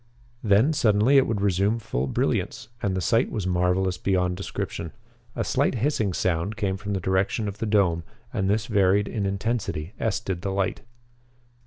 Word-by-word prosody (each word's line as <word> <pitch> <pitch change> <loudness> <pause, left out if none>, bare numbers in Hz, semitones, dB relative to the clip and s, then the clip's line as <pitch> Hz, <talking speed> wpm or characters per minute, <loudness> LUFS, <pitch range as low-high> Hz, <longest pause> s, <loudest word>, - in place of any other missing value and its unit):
Then 110 +8 +4
suddenly 120 -1 +4
it 135 - +5
would 110 -3 -1
resume 100 +3 +2
full 70 - -2
brilliance, - - -1
and 95 -2 0
the - - -1
sight 115 +7 +2
was 105 -5 -3
marvelous 90 0 +1
beyond 90 -2 +1
description. 85 -4 -5 0.4
A - - -1
slight - - +1
hissing 115 -5 0
sound 90 +4 -1
came 100 -4 0
from 100 +1 -4
the 95 - 0
direction 95 +4 0
of 100 +1 -6
the 115 - -2
dome, 95 -6 +2 0.3
and 95 -5 0
this 105 +1 +1
varied 100 -2 +3
in 100 -3 -2
intensity 100 -4 -2
as 110 -2 0
did 95 -6 -4
the 100 - -2
light. 95 0 -1
100 Hz, 175 wpm, -25 LUFS, 95-110 Hz, 0.4 s, it